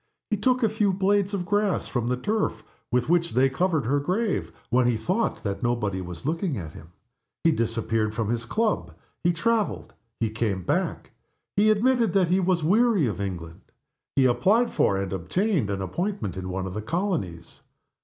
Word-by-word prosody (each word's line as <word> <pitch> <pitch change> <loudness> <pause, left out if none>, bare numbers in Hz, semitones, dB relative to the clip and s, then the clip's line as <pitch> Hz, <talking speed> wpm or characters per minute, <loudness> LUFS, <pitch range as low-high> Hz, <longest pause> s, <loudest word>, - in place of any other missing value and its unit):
He 210 - +2
took 255 +4 +2
a 225 - +4
few 210 -1 +1
blades 200 +1 +2
of 195 -3 -2
grass 205 +1 +1
from 120 -2 -2
the 125 0 0
turf 210 +11 -1 0.3
with 125 0 +1
which 170 0 +2
they 130 +2 +4
covered 160 -2 +1
her 140 +5 +2
grave 190 +8 -1 0.2
when 125 0 +4
he 120 -2 +2
thought 185 - -1
that 100 0 -3
nobody 105 -6 0
was 90 +2 -8
looking 165 -1 -1
at 80 -5 -6
him. 80 +2 -13 0.5
He 165 - +5
disappeared 115 -4 0
from 110 -1 -1
his 115 -1 -2
club. 220 - -1 0.3
He 175 - +4
traveled. 220 +5 -1 0.3
He 115 -2 0
came 105 -4 -1
back. - - -1 0.4
He 210 +2 +4
admitted 230 -1 +3
that 185 -4 +3
he 185 +2 +3
was 180 -3 +1
weary 210 - +4
of 100 -5 -2
England. 85 -4 -5 0.5
He 135 - +4
applied 205 - +3
for, 100 - +2
and 95 -1 -3
obtained, 145 - 0
an 100 -1 -2
appointment 175 - -3
in 95 0 -5
one 95 +1 -3
of 95 - -5
the 105 - -3
colonies. 110 - -3
145 Hz, 185 wpm, -25 LUFS, -, 0.5 s, He